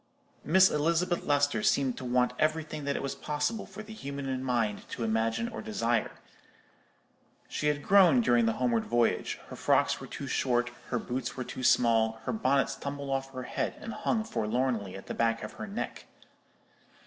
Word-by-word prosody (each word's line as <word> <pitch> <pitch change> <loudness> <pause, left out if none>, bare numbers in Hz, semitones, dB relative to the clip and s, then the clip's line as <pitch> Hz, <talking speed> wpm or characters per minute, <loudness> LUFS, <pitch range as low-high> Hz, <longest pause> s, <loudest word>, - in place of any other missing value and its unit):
Miss 190 +5 +5
Elizabeth 170 +4 +1
Lester 145 -5 +2
seemed 130 +2 +2
to 130 - -6
want 125 0 +2
everything 155 -1 -1
that 140 - 0
it - - -3
was 140 - -2
possible 150 +9 -2
for 205 +2 -9
the 220 +1 -10
human 135 -7 -4
mind 115 -5 -1
to 115 - -4
imagine 115 - 0
or 230 - -6
desire. 120 - 0 1.3
She 150 - -2
had 145 -1 0
grown 185 -9 +6
during 120 -1 +3
the 115 - +2
homeward 120 -2 +1
voyage; 120 -1 +1
her - - -7
frocks - - +2
were - - -7
too - - -6
short, 120 -2 0 0.2
her 125 - -1
boots 125 +2 -4
were 130 - -2
too 130 - -7
small, 115 -3 +4
her - - -2
bonnets 140 -10 +1
tumbled 140 0 -5
off 135 0 -2
her 130 -1 -5
head - - -2
and 225 - -6
hung 220 - 0
forlornly 115 - -1
at 95 - -9
the - - -5
back 115 0 0
of - - -5
her 220 - -7
neck. 205 +2 -5
135 Hz, 180 wpm, -29 LUFS, 120-155 Hz, 1.3 s, grown